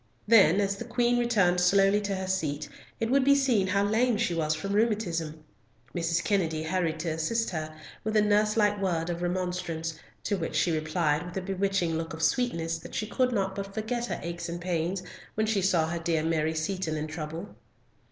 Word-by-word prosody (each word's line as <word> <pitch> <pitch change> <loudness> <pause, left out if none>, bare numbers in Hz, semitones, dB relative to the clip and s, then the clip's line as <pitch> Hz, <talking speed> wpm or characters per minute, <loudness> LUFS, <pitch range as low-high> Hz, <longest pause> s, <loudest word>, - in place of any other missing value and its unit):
Then 200 -5 +6
as 200 -1 0
the 235 - -5
Queen 240 +1 +1
returned 200 -7 +3
slowly 195 +3 +4
to 200 -1 -2
her 190 0 -3
seat 155 -6 -2 0.3
it 225 +1 -1
would 275 0 +4
be 280 +1 +5
seen 250 -9 +2
how 200 +1 +2
lame 225 +3 +2
she 175 - 0
was 155 -2 0
from 195 +6 -4
rheumatism. 175 -8 0 0.5
Mrs. 170 -1 0
Kennedy 165 -6 0
hurried 165 -1 -1
to 165 - -2
assist 160 +9 -1
her, 155 -2 -4 0.3
with 215 0 0
a - - +6
nurse 210 +1 +2
like 205 -1 +2
word 175 -3 0
of 170 0 -4
remonstrance, 180 -2 -2 0.3
to 205 - 0
which 165 -2 -3
she 165 +3 +2
replied 155 0 0
with 180 +1 -7
a - - -1
bewitching 190 -3 0
look 165 0 -5
of 160 - -5
sweetness 165 -11 0
that - - -10
she 215 - -1
could 250 +3 +1
not 195 -4 0
but 195 0 -6
forget 235 +2 -2
her - - -3
aches 170 0 -5
and 170 0 -4
pains 175 +1 -2 0.3
when 220 - +1
she 215 -2 +1
saw 175 -4 +2
her 170 +1 -3
dear 165 -1 0
Mary 160 -1 0
Seaton 160 -1 -2
in 150 - -2
trouble. 160 +4 -6
180 Hz, 200 wpm, -28 LUFS, 165-210 Hz, 0.5 s, Then